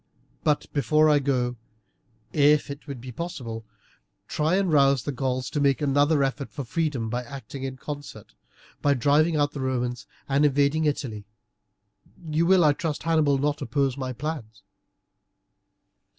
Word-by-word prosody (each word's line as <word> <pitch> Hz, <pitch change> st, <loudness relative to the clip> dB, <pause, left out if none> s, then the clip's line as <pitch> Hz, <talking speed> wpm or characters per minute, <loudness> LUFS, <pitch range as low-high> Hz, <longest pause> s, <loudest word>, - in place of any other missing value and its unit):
But 150 Hz, -1 st, +1 dB
before 155 Hz, +3 st, +3 dB
I 145 Hz, -, +5 dB
go 135 Hz, -2 st, +1 dB
I 125 Hz, -, 0 dB
will, 125 Hz, 0 st, -7 dB, 1.0 s
if 150 Hz, -1 st, -1 dB
it 140 Hz, -2 st, -8 dB
be 125 Hz, +2 st, -8 dB
possible, 120 Hz, -7 st, -6 dB, 0.6 s
try 155 Hz, +4 st, +1 dB
and 190 Hz, -3 st, +1 dB
rouse 140 Hz, -2 st, +4 dB
the 145 Hz, -, -2 dB
Gauls 130 Hz, -1 st, -2 dB
to 145 Hz, -, -1 dB
make 140 Hz, -2 st, +3 dB
another 145 Hz, +1 st, +3 dB
effort 135 Hz, +1 st, -2 dB
for 140 Hz, -, -6 dB
freedom 140 Hz, -3 st, -1 dB
by 120 Hz, +3 st, -2 dB
acting 135 Hz, 0 st, -8 dB
in 130 Hz, -1 st, -4 dB
concert, 145 Hz, +1 st, -8 dB, 0.5 s
by 145 Hz, -1 st, +3 dB
driving 150 Hz, +5 st, +3 dB
out 145 Hz, -1 st, +2 dB
the 140 Hz, -, -6 dB
Romans 125 Hz, -2 st, -2 dB, 0.2 s
and 140 Hz, +1 st, +2 dB
invading 145 Hz, +2 st, +2 dB
Italy. 120 Hz, -8 st, -2 dB, 1.0 s
You 160 Hz, +2 st, +1 dB
will, 185 Hz, -1 st, +5 dB
I 150 Hz, -2 st, +5 dB
trust, 155 Hz, 0 st, -3 dB
Hannibal, 155 Hz, -4 st, +3 dB
not 145 Hz, +2 st, -1 dB
oppose 140 Hz, -3 st, 0 dB
my 130 Hz, -2 st, -4 dB
plans." 120 Hz, -6 st, -6 dB
140 Hz, 155 wpm, -25 LUFS, 130-150 Hz, 1.0 s, I